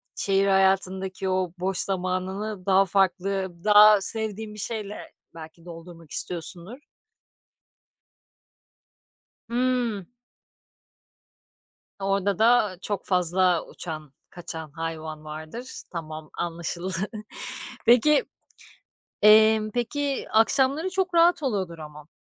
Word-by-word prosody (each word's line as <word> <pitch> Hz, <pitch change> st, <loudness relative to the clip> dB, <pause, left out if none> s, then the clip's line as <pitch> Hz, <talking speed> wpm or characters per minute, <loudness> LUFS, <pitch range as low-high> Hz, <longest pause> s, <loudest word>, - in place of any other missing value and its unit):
şehir 195 Hz, 0 st, +1 dB
hayatındaki 190 Hz, 0 st, +1 dB
o 185 Hz, -2 st, -1 dB
boş 190 Hz, 0 st, -1 dB
zamanını 190 Hz, +2 st, -1 dB
daha 195 Hz, 0 st, +4 dB
farklı 190 Hz, 0 st, 0 dB
daha 210 Hz, -1 st, +7 dB
sevdiğin 220 Hz, +1 st, 0 dB
bir 210 Hz, -, -8 dB
şeyle 210 Hz, 0 st, -5 dB, 0.2 s
belki 160 Hz, +1 st, -12 dB
doldurmak 165 Hz, -2 st, -12 dB
istiyorsundur. 175 Hz, -, -2 dB, 2.7 s
Hımm. 240 Hz, -4 st, -1 dB, 1.9 s
Orada 195 Hz, 0 st, -1 dB
da, 225 Hz, -3 st, +4 dB
eee, 180 Hz, -, -13 dB
çok 205 Hz, -2 st, -2 dB
fazla 180 Hz, -1 st, +2 dB
uçan 155 Hz, -4 st, -8 dB, 0.2 s
kaçan 160 Hz, -3 st, -8 dB
hayvan 160 Hz, -1 st, -6 dB
vardır. 155 Hz, +11 st, -8 dB
Tamam 155 Hz, -2 st, -7 dB
anlaşıldı. 170 Hz, +1 st, -4 dB, 0.9 s
Peki, 265 Hz, +5 st, +5 dB, 1.0 s
eee, 215 Hz, +1 st, +7 dB
peki 275 Hz, +3 st, -2 dB
akşamları 270 Hz, -, +2 dB
çok 375 Hz, -1 st, -1 dB
rahat 335 Hz, -1 st, +4 dB
oluyordur 190 Hz, -, -2 dB
ama 150 Hz, -1 st, -11 dB
190 Hz, 90 wpm, -25 LUFS, 170-220 Hz, 2.7 s, daha